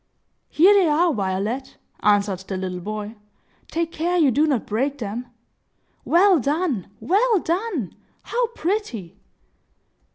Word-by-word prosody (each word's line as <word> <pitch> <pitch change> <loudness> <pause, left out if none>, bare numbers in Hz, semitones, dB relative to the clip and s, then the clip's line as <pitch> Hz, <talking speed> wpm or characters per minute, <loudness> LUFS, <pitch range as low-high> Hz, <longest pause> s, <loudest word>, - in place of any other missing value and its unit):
"Here 365 +6 +6
they 390 -4 +4
are, 320 +2 +3
Violet!" 205 +5 -3 0.2
answered 205 -2 +2
the 190 - -3
little 185 -1 -4
boy. 215 +3 -6 0.5
"Take 330 0 -2
care 345 +3 -1
you 300 -6 +4
do 295 +6 +2
not 270 -7 0
break 270 +7 -1
them. 235 +1 -5 0.8
Well 365 0 +5
done! 285 - -1
Well 410 - +2
done! 345 - -2 0.3
How 485 0 0
pretty!" 315 - -4
280 Hz, 125 wpm, -22 LUFS, 210-350 Hz, 0.8 s, Here